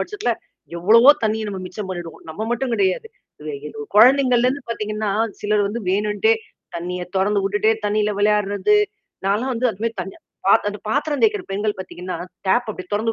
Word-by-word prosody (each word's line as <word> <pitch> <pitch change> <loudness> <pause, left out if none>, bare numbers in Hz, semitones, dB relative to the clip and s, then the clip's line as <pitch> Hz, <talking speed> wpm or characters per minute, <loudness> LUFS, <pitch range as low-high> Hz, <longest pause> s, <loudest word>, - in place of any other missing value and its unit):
பட்சத்துல 415 0 -2 0.5
எவ்வளவோ 230 +9 +7
தண்ணீர் 220 -1 0
நம்ம 195 -2 -5
மிச்சம் 190 +2 -6
பண்ணிடுவோம். 175 -3 -7
நம்ம 180 +7 -5
மட்டும் 240 +1 -1
கிடையாது. 195 - +1 0.3
இதுல 150 -1 -5
இதுல 145 -1 -7
குழந்தைங்கள்லேருந்து 255 +2 +5
பார்த்தீங்கன்னா, 215 -1 -2 0.3
சிலர் 210 0 +1
வந்து 230 +4 -4
வேணுன்ட்டே 210 +2 +2 0.4
தண்ணீய 180 +1 -4
தொறந்து 200 +2 +2
விட்டுட்டே 210 +3 +2
தண்ணீல 210 0 +1
விளையாடுறது 210 - +2 0.5
நான்லாம் 220 +7 +1
வந்து 245 +2 +1
அதுமாரி 230 +3 -3
தண் 190 +1 -6 0.3
பாத் 200 - +4
அந்த 205 - -8
பாத்திரம் 285 +4 0
தேய்கிற 425 -3 +3
பெண்கள் 205 +1 -1
பார்த்தீங்கன்னா, 180 -1 -6 0.3
டாப் 240 +6 +2
அப்டியியே 185 -3 -9
தொறந்து 225 +2 0
210 Hz, 155 wpm, -21 LUFS, 195-235 Hz, 0.5 s, எவ்வளவோ